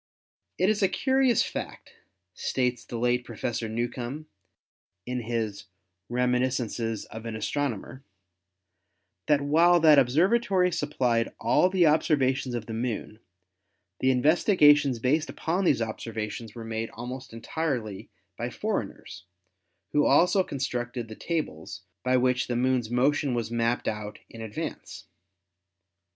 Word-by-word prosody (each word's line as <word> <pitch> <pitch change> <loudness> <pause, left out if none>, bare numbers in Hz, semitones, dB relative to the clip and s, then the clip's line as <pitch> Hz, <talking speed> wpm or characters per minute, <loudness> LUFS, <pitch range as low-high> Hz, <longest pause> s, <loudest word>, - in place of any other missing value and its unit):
"It 185 - +2
is 215 0 +1
a 195 - +5
curious 265 -3 +2
fact," - - -7 0.4
states 125 +3 -1
the 120 - -6
late 125 +1 +1
Professor 115 -3 -4
Newcomb 120 +5 -4 0.8
in 125 0 -3
his 110 -4 -3 0.4
"Reminiscences 125 -3 0
of 110 +1 -8
an 115 - -4
Astronomer," 130 +1 -3 1.2
"that 150 -2 +4
while 165 +5 +4
that 155 -3 +7
observatory 180 - +3
supplied 125 -7 0
all 180 - +3
the 185 -2 +3
observations 135 -5 +2
of 115 -2 -4
the 110 - -6
Moon, 110 -2 -4 0.8
the 130 - +2
investigations 145 - +4
based 150 +7 +1
upon 180 +4 -1
these 120 - +3
observations 110 0 -5
were 115 -1 -7
made 115 0 -3
almost 125 +3 -7
entirely 115 -3 -3 0.3
by - - -2
foreigners, 90 0 -4 0.7
who 150 - +3
also 180 +3 +4
constructed 120 -5 -4
the 110 - -8
tables 95 - -4 0.2
by 130 0 +3
which 125 0 +1
the 120 - -2
Moon's 125 -2 +1
motion 130 +2 +1
was 115 -1 -2
mapped 120 +1 0
out 105 -1 -4
in 115 - -9
advance. 110 -2 -6
125 Hz, 125 wpm, -27 LUFS, 115-150 Hz, 1.2 s, that